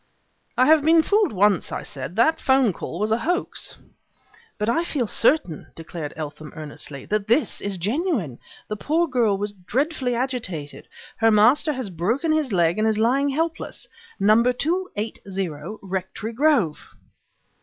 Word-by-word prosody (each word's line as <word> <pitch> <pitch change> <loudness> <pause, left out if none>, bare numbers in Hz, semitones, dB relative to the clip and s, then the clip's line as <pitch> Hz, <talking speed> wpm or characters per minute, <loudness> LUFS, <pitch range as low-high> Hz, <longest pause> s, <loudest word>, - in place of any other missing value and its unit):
"I 255 - +5
have 315 +1 +6
been 320 +2 +5
fooled 415 -2 +2
once," 200 -2 +2
I - - -4
said. 140 +5 -7
"That 280 +8 +3
'phone 265 -6 +3
call 170 - -6
was 215 +1 0
a 225 - +2
hoax 350 +7 -2 0.4
" 465 -1 -28
"But 210 - -2
I 240 +9 +2
feel 285 -7 -1
certain," 225 - +1
declared 165 -2 -6
Eltham, 150 0 -7
earnestly, 145 -2 -8
"that 210 -1 -1
this 240 +7 +1
is 200 -2 -2
genuine! 210 - -1 0.3
The 210 - -4
poor 325 +9 +1
girl 230 -8 +2
was 205 +1 -3
dreadfully 250 - -1
agitated; 225 - -4 0.3
her 225 0 +4
master 240 +9 +4
has 255 -7 -4
broken 225 - 0
his 310 -5 +1
leg 175 0 +2
and 220 - +2
is 220 -1 +1
lying 260 +6 +2
helpless: 325 +4 -3 0.3
number 215 +5 +4
280, 305 - -2 0.6
Rectory 190 +4 -4
Grove." 255 - +1
225 Hz, 155 wpm, -23 LUFS, 190-295 Hz, 0.6 s, have